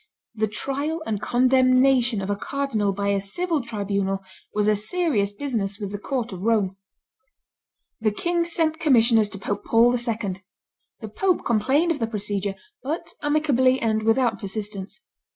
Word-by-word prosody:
The 220 -1 0
trial 285 +9 -3
and 210 -2 -2
condemnation 255 -2 +3
of 195 - -2
a - - +1
cardinal 225 -4 -1
by 200 +1 -2
a 200 -1 +1
civil 320 - -2
tribunal 200 -4 -2 0.3
was 210 0 0
a 215 - +4
serious 215 - 0
business 205 -4 -3
with 200 -2 -5
the 205 - -5
court 245 0 -3
of 185 -2 -7
Rome. 205 -3 +1 1.2
The 220 -1 +2
king 345 +10 0
sent 325 -2 0
commissioners 230 -7 +4
to 200 - -7
Pope 200 +1 -3
Paul 230 +1 +4
II.: 225 -6 -2 0.6
the 220 - -5
pope 365 - 0
complained 270 +9 +2
of 315 - -2
the 225 - 0
procedure, 205 -2 -2 0.3
but 305 +6 -4
amicably 280 -4 +2
and 220 -1 +1
without 225 +2 +2
persistence. 205 - -5
225 Hz, 150 wpm, -24 LUFS, 205-270 Hz, 1.2 s, a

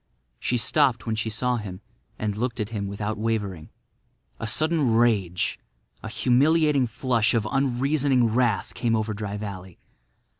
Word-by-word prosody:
She 125 - 0
stopped 125 -2 +2
when 115 - -1
she 110 0 -2
saw 125 +3 0
him 95 -4 -6 0.4
and 105 -1 -2
looked 120 +2 -2
at 105 -1 -2
him 105 -3 -3
without 105 +2 -4
wavering. 105 -7 -2 0.7
A 115 - -3
sudden 155 +4 +2
rage—a 105 -3 -1
humiliating 140 +4 +3
flush 120 -1 +1
of 110 -2 0
unreasoning 135 0 +2
wrath—came 120 0 +1
over 110 0 -1
Dry 105 0 -4
Valley. 95 -4 -7
115 Hz, 135 wpm, -25 LUFS, 105-125 Hz, 0.7 s, humiliating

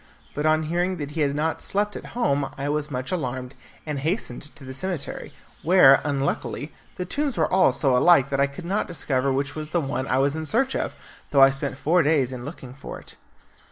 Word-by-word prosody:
But 150 +2 -1
on 155 0 +3
hearing 175 +4 -1
that 145 -2 -5
he 160 +1 -3
had 140 -1 +1
not 155 +2 -1
slept 205 +1 -1
at - - -7
home 140 - +1
I 140 +1 -2
was 150 0 -1
much 130 +3 -4
alarmed, 130 -6 -3 0.3
and 150 -3 -3
hastened 155 - -2
to 140 - -13
the 130 0 -7
cemetery, 175 +2 -4 0.3
where, 160 -6 +6
unluckily, 145 +1 -2 0.2
the 180 - -4
tombs 285 +5 -1
were - - +1
all 190 - +5
so 135 -5 +2
alike 140 0 +5
that 135 - 0
I 140 - +4
could 140 +5 -10
not 195 +4 -1
discover 140 -6 -1
which 135 +2 -1
was 155 -1 -5
the 170 - +1
one 135 -3 -3
I - - +1
was 140 +2 +2
in 160 0 -4
search 265 - +1
of, - - -2 0.3
though 140 -2 +6
I 135 - +7
spent 135 -1 -3
four 170 +5 +3
days 140 -4 +2
in 125 -1 -7
looking 135 -4 -9
for 135 - -8
it. - - -14
145 Hz, 220 wpm, -24 LUFS, 135-170 Hz, 0.3 s, I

